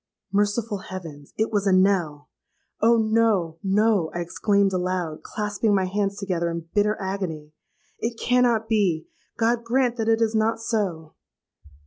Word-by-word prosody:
Merciful 205 +1 0
heavens! 165 -8 -9
it 220 +1 0
was 205 -2 0
a - - +4
knell! 185 -6 +2 0.5
'Oh! 230 +2 +5
no—no,' 210 -3 +2
I 175 - -1
exclaimed 200 +3 +1
aloud, 180 -3 -2
clasping 210 0 -1
my 190 -1 +2
hands 200 +1 -1
together 180 -4 -1
in 165 -1 -5
bitter 210 +1 +2
agony; 185 -6 -4 0.5
'it 230 0 -3
cannot 240 -3 +2
be! 195 -8 +1 0.3
God 235 +1 +1
grant 245 0 +1
that 225 -1 0
it 225 0 +3
is 225 -1 +1
not 220 +1 +1
so!' 190 -9 -2
200 Hz, 140 wpm, -24 LUFS, 180-225 Hz, 0.5 s, Oh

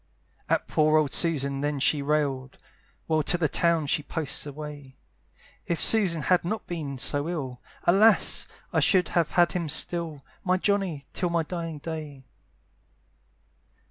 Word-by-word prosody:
At - - 0
poor 155 0 +3
old 150 -3 +1
Susan 140 -5 0
then 145 -1 -2
she 145 +2 +2
railed, 140 -3 -2 0.5
While 155 -1 +1
to 175 - +1
the 165 -2 +1
town 170 0 +1
she 145 - 0
posts 150 -1 -4
away; 145 -2 -9 0.7
"If 170 - -1
Susan 185 -8 +3
had 180 +3 +2
not 215 +6 -4
been 150 -6 -5
so 145 +4 -1
ill, 135 -8 -5 0.2
"Alas! 205 +5 +4 0.3
I - - +3
should 185 -2 +3
have 170 -3 +1
had 175 -2 +4
him 170 -3 -3
still, 160 -2 +2 0.2
"My 185 0 +1
Johnny, 190 -7 -1
till 180 - -1
my 170 -1 0
dying 165 -1 -5
day." 150 -3 -7
155 Hz, 145 wpm, -26 LUFS, 145-175 Hz, 0.7 s, Alas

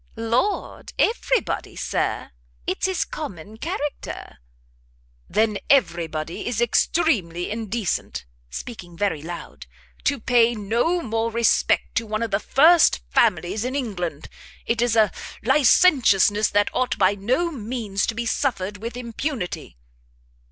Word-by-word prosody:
"Lord, 230 - -1
every 475 0 +2
body, - - -5
Sir! - - -2 0.3
it's 190 - 0
his 375 -3 0
common 210 - -7
character." 295 - -5 0.9
"Then 210 +1 +1
every 170 -12 +3
body 155 +1 -5
is 240 -3 -1
extremely 220 - +1
indecent," 215 - -3 0.2
speaking 175 - -8
very 195 -7 0
loud, 150 - -8 0.4
"to 280 -1 +1
pay 235 0 +3
no 235 - 0
more 225 0 -1
respect 230 0 +2
to 225 0 0
one 215 +1 -2
of 230 - -3
the 195 - +2
first 315 - +5
families 180 - +2
in 255 +2 -3
England. 180 - -3 0.4
It 230 0 0
is 240 -2 +2
a 215 -3 +4 0.3
licentiousness 240 - +4
that 205 0 +1
ought 255 - 0
by 195 -1 +4
no 255 - 0
means 220 -6 -3
to 230 - -2
be 235 +1 -3
suffered 210 -6 -1
with 230 +4 -6
impunity." 235 - -4
225 Hz, 130 wpm, -23 LUFS, 195-255 Hz, 0.9 s, first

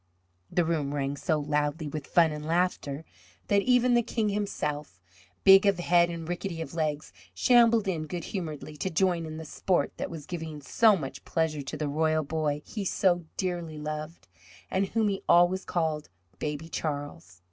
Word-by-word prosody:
The 175 - +2
room 150 -4 -1
rang 140 0 -1
so 155 +2 0
loudly 150 +1 -1
with 145 0 -5
fun 165 -2 +4
and 150 0 -5
laughter 160 -3 -1 0.4
that 200 0 +4
even 250 +1 +3
the 240 - +5
King 225 -2 -1
himself, 150 - -3 0.4
big 195 +1 +8
of 200 -2 +3
head 175 0 +3
and 165 -1 -6
rickety 175 0 -4
of 160 -3 -6
legs, 155 -2 -2 0.2
shambled 235 -4 +5
in 160 -4 -2
good 170 +1 -4
humouredly 155 -5 -5
to 190 - -2
join 170 -1 +1
in 155 0 -6
the 160 - -7
sport 180 +3 0
that - - -3
was 160 -4 -8
giving 160 -3 -6
so 210 +8 +4
much 135 -5 -6
pleasure 160 -3 -1
to 140 +2 -6
the 150 0 -2
royal 155 +2 +1
boy 150 -1 -2
he 210 - -5
so 175 -2 +1
dearly 175 -4 -3
loved, 155 - -6 0.4
and 195 +1 +1
whom 220 +1 +1
he 195 -1 -1
always 175 +2 +5
called 160 - -1 0.3
"Baby 150 +1 -3
Charles." 145 - -5
160 Hz, 175 wpm, -28 LUFS, 150-185 Hz, 0.4 s, big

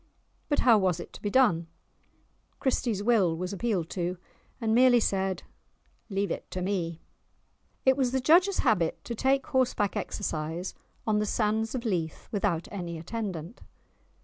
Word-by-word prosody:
But 290 - +2
how 230 -4 +6
was 185 -3 +1
it - - -9
to - - -11
be 205 - -1
done? 205 -9 +3 0.9
Christie's 235 -6 0
Will 200 -8 +3
was 180 +3 -3
appealed 195 -5 -1
to, 180 0 -2 0.4
and 225 -3 0
merely 245 0 +6
said 190 -3 0 0.7
"Leave 195 -2 -1
it - - -5
to 185 - -4
me." 175 -4 -2 0.8
It 265 0 +6
was 260 -3 +1
the 265 - +1
judge's 355 +9 +4
habit 190 -9 +1
to 235 - -5
take 265 +3 +1
horseback 255 -8 +1
exercise 165 -2 -3 0.3
on 215 -1 +2
the 210 - 0
sands 220 +2 0
of 245 -1 -4
Leith 170 -7 -2
without 195 -6 0
any 175 -4 -5
attendant. 185 0 -5
205 Hz, 150 wpm, -28 LUFS, 180-240 Hz, 0.9 s, how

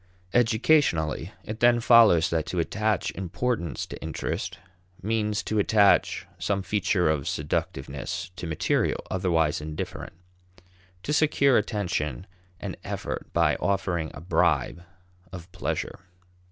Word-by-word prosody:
Educationally, 110 - +2
it 110 +1 -6
then 120 0 +5
follows 115 -9 +6
that 80 -2 0
to 90 - -4
attach 105 +4 0
importance 95 - -3
to - - -9
interest 90 +3 -4 0.4
means 105 0 -1
to 110 - -1
attach 100 0 +3
some 100 -1 -1
feature 100 -3 +1
of 75 -3 0
seductiveness 70 +1 -3
to 85 - -6
material 80 -2 0
otherwise 85 -4 +1
indifferent; 75 0 -6 0.9
to 150 - -2
secure 140 -3 +3
attention 90 - -1 0.3
and - - -6
effort - - -5
by - - +3
offering 95 -5 -1
a - - -9
bribe 85 0 +1 0.5
of 90 -1 -10
pleasure. - - -3
95 Hz, 115 wpm, -26 LUFS, 80-110 Hz, 0.9 s, follows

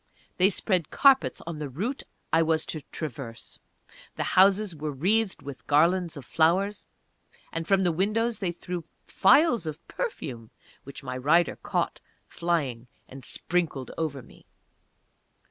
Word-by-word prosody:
They 185 +1 +6
spread 185 -5 0
carpets 275 -2 +4
on 165 -2 -5
the 150 -2 -4
route 210 - -3 0.3
I 165 - +5
was 160 -1 +2
to 155 - -5
traverse; 120 -6 -7 0.6
the - - -1
houses 195 0 +4
were 155 0 -4
wreathed 195 +9 0
with 140 -1 -9
garlands 170 +3 +3
of 140 - -9
flowers, 190 +6 +1 0.7
and 165 0 -3
from 195 -1 +3
the 175 - +3
windows 215 +7 0
they 185 -4 -1
threw 175 0 -6 0.2
phials 235 - +4
of 155 -1 -7
perfume, 130 - -5 0.4
which 140 - -10
my 125 - -5
rider 155 +7 +3
caught, - - -2 0.3
flying, 140 -9 -2 0.2
and 135 0 -11
sprinkled 160 -6 -1
over 145 -5 -3
me. - - -19
165 Hz, 140 wpm, -27 LUFS, 145-190 Hz, 0.7 s, They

